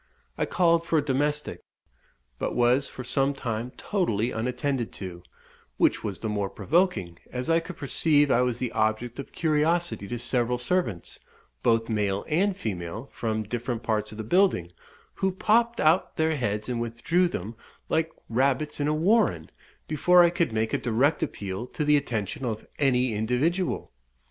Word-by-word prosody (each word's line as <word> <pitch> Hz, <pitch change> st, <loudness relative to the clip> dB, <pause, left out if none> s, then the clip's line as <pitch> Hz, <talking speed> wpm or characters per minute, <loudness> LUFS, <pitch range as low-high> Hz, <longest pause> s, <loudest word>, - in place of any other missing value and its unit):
I -, -, -1 dB
called 170 Hz, -2 st, +3 dB
for 165 Hz, -1 st, +1 dB
a 145 Hz, -, +1 dB
domestic, 145 Hz, +2 st, -1 dB, 0.8 s
but -, -, -2 dB
was 125 Hz, +3 st, +3 dB
for 130 Hz, -, -8 dB
some 135 Hz, +3 st, +1 dB
time 115 Hz, -2 st, -3 dB
totally 120 Hz, -, 0 dB
unattended 125 Hz, +2 st, -2 dB
to; 90 Hz, -3 st, -7 dB, 0.6 s
which -, -, +2 dB
was 100 Hz, -4 st, -4 dB
the 110 Hz, -, -2 dB
more 105 Hz, -2 st, -1 dB
provoking, 155 Hz, -, 0 dB
as 125 Hz, +5 st, -2 dB
I 165 Hz, -, +5 dB
could 170 Hz, +1 st, -9 dB
perceive 145 Hz, 0 st, +3 dB
I 120 Hz, -, +4 dB
was 125 Hz, -2 st, 0 dB
the 125 Hz, -1 st, -3 dB
object 110 Hz, +3 st, -1 dB
of 140 Hz, -, -7 dB
curiosity 160 Hz, -, 0 dB
to 120 Hz, -, -3 dB
several 120 Hz, 0 st, 0 dB
servants, 125 Hz, -, -2 dB, 0.4 s
both 115 Hz, -1 st, +2 dB
male 100 Hz, -3 st, -1 dB
and 185 Hz, +5 st, +1 dB
female, 105 Hz, -, -5 dB
from 110 Hz, -1 st, -2 dB
different 120 Hz, +1 st, -4 dB
parts 110 Hz, -1 st, -1 dB
of 105 Hz, -, -10 dB
the 110 Hz, -, -4 dB
building, 120 Hz, -, +2 dB, 0.4 s
who 190 Hz, -, 0 dB
popped 230 Hz, +5 st, +2 dB
out 160 Hz, +4 st, +2 dB
their 160 Hz, 0 st, +2 dB
heads 105 Hz, -5 st, -2 dB
and 120 Hz, -2 st, -2 dB
withdrew 120 Hz, +11 st, +1 dB
them, 110 Hz, -, -5 dB, 0.3 s
like 160 Hz, 0 st, +1 dB, 0.2 s
rabbits 135 Hz, +5 st, 0 dB
in 145 Hz, -, +1 dB
a 150 Hz, -, +1 dB
warren, 170 Hz, -, +2 dB, 0.4 s
before 175 Hz, +4 st, +5 dB
I 170 Hz, -, +4 dB
could 170 Hz, -6 st, 0 dB
make 110 Hz, 0 st, -1 dB
a -, -, +2 dB
direct 130 Hz, +7 st, +1 dB
appeal 100 Hz, +4 st, -4 dB
to 150 Hz, -, -3 dB
the 150 Hz, 0 st, +5 dB
attention 135 Hz, -1 st, -2 dB
of 110 Hz, -3 st, -3 dB
any 125 Hz, -4 st, +2 dB
individual. 130 Hz, -, 0 dB
125 Hz, 165 wpm, -26 LUFS, 110-160 Hz, 0.8 s, I